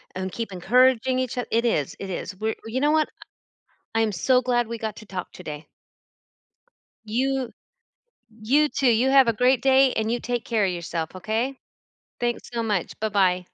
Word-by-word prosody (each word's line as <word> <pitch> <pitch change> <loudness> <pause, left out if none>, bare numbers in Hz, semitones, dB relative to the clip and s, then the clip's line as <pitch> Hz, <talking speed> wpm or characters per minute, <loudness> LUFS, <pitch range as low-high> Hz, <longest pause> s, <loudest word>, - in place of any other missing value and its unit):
and 185 0 -3
keep 225 -1 -5
encouraging 255 +6 +3
each 255 -1 -3
oth 245 - -2
it 230 +1 +2
is, 150 - 0
it 195 - -6
is. 185 +1 -5
We're 220 +3 -2
you 235 +4 -2
know 295 +1 +3
what? 310 -1 +2 0.8
I'm 225 -1 +2
so 250 +7 +2
glad 240 -2 +1
we 230 0 -5
got 220 -2 -4
to 215 - -11
talk 185 -3 -6
today. 155 -4 -8 1.4
You 255 +2 -1 0.9
you, 290 +7 +3
too. 270 -4 +2
You 235 +4 +3
have 270 -3 +6
a - - +4
great 250 +3 +2
day, 265 -1 +5
and 220 0 -1
you 240 - 0
take 240 0 -3
care 220 -4 +1
of 185 - +1
yourself, 170 -1 -4
okay? 225 +8 -2 0.7
Thanks 240 0 -2
so 230 -1 -1
much. 205 -5 -2
Bye 220 0 -1
bye. 185 -3 +2
230 Hz, 180 wpm, -24 LUFS, 200-255 Hz, 1.4 s, have